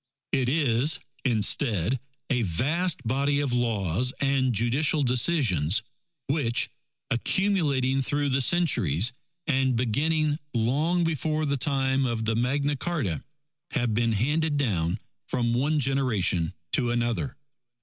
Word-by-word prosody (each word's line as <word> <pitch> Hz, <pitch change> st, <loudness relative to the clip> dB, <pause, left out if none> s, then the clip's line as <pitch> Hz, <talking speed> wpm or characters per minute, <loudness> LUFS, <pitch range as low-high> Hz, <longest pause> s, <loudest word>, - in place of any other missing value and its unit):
It 125 Hz, -2 st, +1 dB
is, 140 Hz, -1 st, +2 dB, 0.3 s
instead, 115 Hz, -, +1 dB, 0.3 s
a 125 Hz, -2 st, +2 dB
vast 135 Hz, -, 0 dB
body 140 Hz, +4 st, +1 dB
of 140 Hz, -4 st, -1 dB
laws 115 Hz, -1 st, 0 dB
and 135 Hz, -2 st, +2 dB
judicial 130 Hz, +7 st, +1 dB
decisions, 120 Hz, -, +2 dB, 0.4 s
which, 135 Hz, -5 st, 0 dB, 0.4 s
accumulating 140 Hz, -, +2 dB
through 145 Hz, +2 st, 0 dB
the 135 Hz, +1 st, +1 dB
centuries, 120 Hz, -, +2 dB, 0.3 s
and 130 Hz, -4 st, +1 dB
beginning 150 Hz, +6 st, 0 dB, 0.2 s
long 150 Hz, +10 st, +1 dB
before 155 Hz, -1 st, -1 dB
the 140 Hz, -1 st, 0 dB
time 135 Hz, 0 st, +1 dB
of 115 Hz, -2 st, -2 dB
the 110 Hz, 0 st, 0 dB
Magna 140 Hz, +5 st, 0 dB
Carta, 140 Hz, -, -2 dB, 0.5 s
have 120 Hz, -6 st, 0 dB
been 115 Hz, +1 st, +1 dB
handed 150 Hz, +7 st, 0 dB
down 95 Hz, -9 st, 0 dB, 0.3 s
from 120 Hz, -2 st, 0 dB
one 145 Hz, +5 st, +1 dB
generation 120 Hz, -, 0 dB, 0.2 s
to 120 Hz, -, +1 dB
another. 120 Hz, +2 st, -1 dB
130 Hz, 120 wpm, -26 LUFS, 115-145 Hz, 0.5 s, is